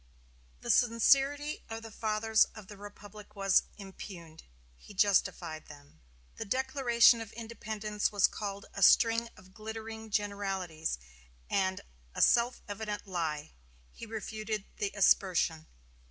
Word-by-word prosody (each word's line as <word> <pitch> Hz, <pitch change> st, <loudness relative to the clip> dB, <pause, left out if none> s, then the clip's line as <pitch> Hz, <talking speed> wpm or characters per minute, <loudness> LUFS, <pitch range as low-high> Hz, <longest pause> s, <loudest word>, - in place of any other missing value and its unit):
The -, -, 0 dB
sincerity 275 Hz, +5 st, +3 dB
of 225 Hz, 0 st, -6 dB
the 225 Hz, -, -9 dB
fathers 220 Hz, 0 st, +2 dB
of 215 Hz, -2 st, -10 dB
the 205 Hz, -, -11 dB
Republic 205 Hz, +1 st, -12 dB
was 195 Hz, -2 st, +4 dB, 0.2 s
impugned 185 Hz, -5 st, -10 dB, 0.3 s
he 205 Hz, -, -15 dB
justified 175 Hz, -5 st, +1 dB
them. 145 Hz, -, -15 dB, 0.4 s
The -, -, -3 dB
Declaration 245 Hz, -1 st, +4 dB
of 225 Hz, -1 st, -8 dB
Independence 215 Hz, -2 st, -3 dB
was 205 Hz, -2 st, +4 dB
called 200 Hz, -1 st, -3 dB
a 200 Hz, -, -6 dB
"string 230 Hz, +3 st, +5 dB
of 185 Hz, 0 st, -17 dB
glittering 220 Hz, +1 st, -7 dB
generalities" 195 Hz, -, -2 dB, 0.5 s
and 190 Hz, -1 st, +1 dB, 0.3 s
a -, -, -2 dB
"self 240 Hz, +1 st, +3 dB
evident 210 Hz, 0 st, -5 dB
lie"; 160 Hz, -, -3 dB, 0.4 s
he 230 Hz, -, -10 dB
refuted 215 Hz, -1 st, -4 dB
the 200 Hz, -1 st, -1 dB
aspersion. 175 Hz, -5 st, +3 dB
210 Hz, 125 wpm, -31 LUFS, 190-225 Hz, 0.5 s, string